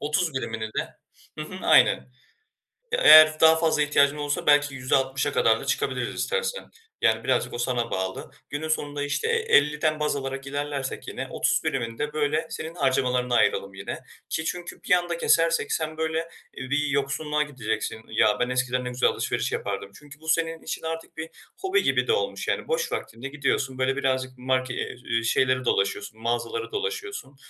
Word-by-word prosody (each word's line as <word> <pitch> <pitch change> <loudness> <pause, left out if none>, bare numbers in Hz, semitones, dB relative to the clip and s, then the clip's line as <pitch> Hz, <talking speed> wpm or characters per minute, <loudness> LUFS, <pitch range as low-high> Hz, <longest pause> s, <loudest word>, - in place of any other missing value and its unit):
30 155 +1 0
birimini 115 -4 -3
de 110 - -3 0.5
Hı - - -3
hı, - - -8
aynen. - - +6 1.0
Ya, 465 - +1
eğer 155 0 +9
daha 160 0 +7
fazla 160 -2 +1
ihtiyacın 145 0 +3
olursa 145 -1 -2
belki 145 -1 +4
%60'a 130 +1 0
kadar 470 0 +3
da - - -8
çıkabiliriz - - -1
istersen. 480 0 -2 0.4
Yani, 110 0 +2
birazcık 130 -2 0
o - - -4
sana 120 -1 -1
bağlı. 95 0 -3 0.2
Günün 150 +2 -4
sonunda, 145 -2 -2
işte, 145 - -1
e - - +2
elliden 155 - +2
baz 150 -1 0
alarak 135 0 -5
ilerlersek 140 -1 -4
yine - - -5
30 - - +1
birimini 115 -3 -2
de 150 0 -2
böyle 155 +1 0
senin 160 +2 -6
harcamalarına 130 -4 +1
ayıralım 100 -3 +2
yine. 95 +1 -6 0.3
Ki 160 - -2
çünkü 175 +1 -5
bir - - -6
anda 175 -1 +1
kesersek 165 -3 +2
sen 155 -1 -2
böyle, 160 +1 -2 0.3
iii, 130 - -6
bir 150 +1 +1
yoksunluğa 145 +2 0
gideceksin. 115 -6 -4
"Ya, 110 -1 +3
ben, 125 - 0
eskiden 125 0 0
ne - - -2
güzel 125 0 +2
alışveriş - - -2
yapardım." 100 -1 -4
Çünkü 150 0 -15
bu, 160 - -15
senin 165 0 0
için - - -5
artık 165 0 -6
bir 160 0 -5 0.3
hobi 395 0 +1
gibi - - +1
de 455 - +3
olmuş, 465 +1 -2
yani, - - -1
boş 475 -1 -1
vaktinde 115 +4 -5
gidiyorsun, 135 -2 -1
böyle, 130 +1 +1
birazcık 130 -2 0
marke 130 0 -1
eee, - - -4
iii, 115 0 0
şeyleri 130 +2 +2
dolaşıyorsun, 110 +1 -1
mağazaları 120 - -2
dolaşıyorsun. 420 - -4
145 Hz, 175 wpm, -25 LUFS, 130-160 Hz, 1.0 s, eğer